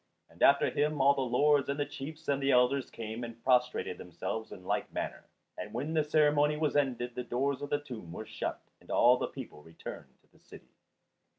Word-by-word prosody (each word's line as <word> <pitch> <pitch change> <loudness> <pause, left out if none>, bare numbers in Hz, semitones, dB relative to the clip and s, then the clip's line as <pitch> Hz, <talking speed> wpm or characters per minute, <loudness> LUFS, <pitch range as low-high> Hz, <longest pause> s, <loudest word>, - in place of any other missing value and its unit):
After 140 0 +5
him 150 0 0
all 140 +1 +6
the 140 - -2
lords 140 +3 +3
and 140 +1 -1
the 145 - +1
chiefs 145 +3 -8
and 140 -1 +1
the 135 - +1
elders 125 +1 +3
came 115 +1 -6
and 115 -1 -8
prostrated 125 -6 +1
themselves 90 +6 -5
in 90 - -10
like - - -1
manner; - - -4 0.3
and 105 +2 -6
when 145 +6 -2
the 155 -1 +3
ceremony 150 0 +3
was 150 -2 0
ended 125 -4 0
the 125 - -4
doors 130 +3 -1
of 145 - -5
the 145 - +2
tomb 125 - -9
were 110 - -6
shut - - -4 0.2
and - - -22
all 125 +1 +5
the - - -2
people 75 - -9
returned 80 +2 -10
to - - -31
the - - -24
city. - - -15
135 Hz, 205 wpm, -31 LUFS, 120-145 Hz, 0.3 s, all